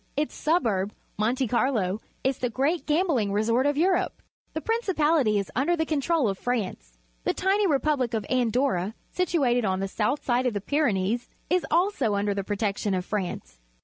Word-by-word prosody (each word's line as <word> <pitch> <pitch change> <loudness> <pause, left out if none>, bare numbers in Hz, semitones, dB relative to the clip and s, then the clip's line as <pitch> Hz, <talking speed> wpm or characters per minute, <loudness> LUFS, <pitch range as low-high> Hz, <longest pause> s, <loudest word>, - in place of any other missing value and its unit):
Its 295 +1 0
suburb, 220 - 0 0.2
Monte 245 +4 +1
Carlo, 220 -5 0 0.2
is 265 0 0
the 250 - 0
great 280 +8 0
gambling 300 - +2
resort 230 +6 +2
of 290 0 +1
Europe. 360 +3 +1 0.3
The 315 - -2
principahty 315 - +2
is 200 - -4
under 280 +8 +2
the 320 - +1
control 310 -2 +1
of 195 -2 -2
France. 190 - -3 0.3
The - - 0
tiny 395 +2 +2
repubhc 275 -5 +1
of 215 - -2
Andorra, 240 -5 +1 0.2
situated 275 -10 +1
on 190 -2 0
the 195 - -1
swjth 210 +8 -1
side 250 0 +1
of 235 - -1
the - - 0
Pyrenees, 235 -4 0 0.2
is 360 -1 +2
also 330 - +2
under 200 0 0
the 200 0 -2
protection 205 -1 -1
of 180 -1 -2
France. 185 - -4
245 Hz, 170 wpm, -26 LUFS, 205-305 Hz, 0.3 s, gambling